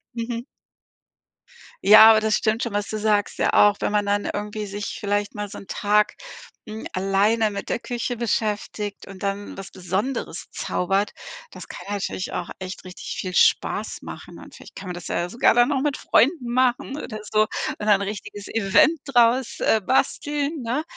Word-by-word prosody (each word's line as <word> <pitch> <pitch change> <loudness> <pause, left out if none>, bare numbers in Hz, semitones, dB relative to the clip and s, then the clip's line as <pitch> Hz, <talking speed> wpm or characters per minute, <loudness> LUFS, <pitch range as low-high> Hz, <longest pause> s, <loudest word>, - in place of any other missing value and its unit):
Mhm. 230 0 -3 1.4
Ja, 215 +2 +10
aber 220 - +5
das 215 0 +1
stimmt 220 +2 0
schon, 235 -4 -3
was 205 0 -2
du 215 - -3
sagst, 210 -1 +1
ja, - - +1
auch 205 0 +5
wenn - - -1
man 205 -1 +2
dann 205 0 0
irgendwie 210 +1 -4
sich 205 +1 -5
vielleicht 205 0 -1
mal 210 0 -4
so 205 - -10
'n - - -12
Tag, 210 +1 +1 0.5
hm, 215 +1 -7
alleine 205 +4 +2
mit 200 - -6
der - - -1
Küche 245 0 -4
beschäftigt 210 -2 -2
und 195 0 -10
dann 200 +1 -3
was 195 - -8
Besonderes 190 +8 -3
zaubert. 195 +3 -1 0.4
Das - - -11
kann - - -9
natürlich 200 -2 -3
auch 175 - -4
echt 185 0 -7
richtig 185 0 -7
viel 185 -1 -4
Spaß - - +2
machen - - -10
und - - -13
vielleicht - - -14
kann 190 -2 -8
man - - -3
das 175 - -8
ja 175 +1 -2
sogar 235 - +3
dann 240 +3 +4
noch 275 -2 +1
mit 290 -2 0
Freunden 255 -2 +2
machen 255 +2 +1
oder 215 -2 -7
so 215 0 +4 0.3
und 210 - -5
ein 200 -1 +5
richtiges 205 0 -6
Event 225 - +3
draus, 245 -1 +2
äh, 220 - +3
basteln, 285 - 0
ne, 250 +7 -1
210 Hz, 180 wpm, -23 LUFS, 200-235 Hz, 1.4 s, Ja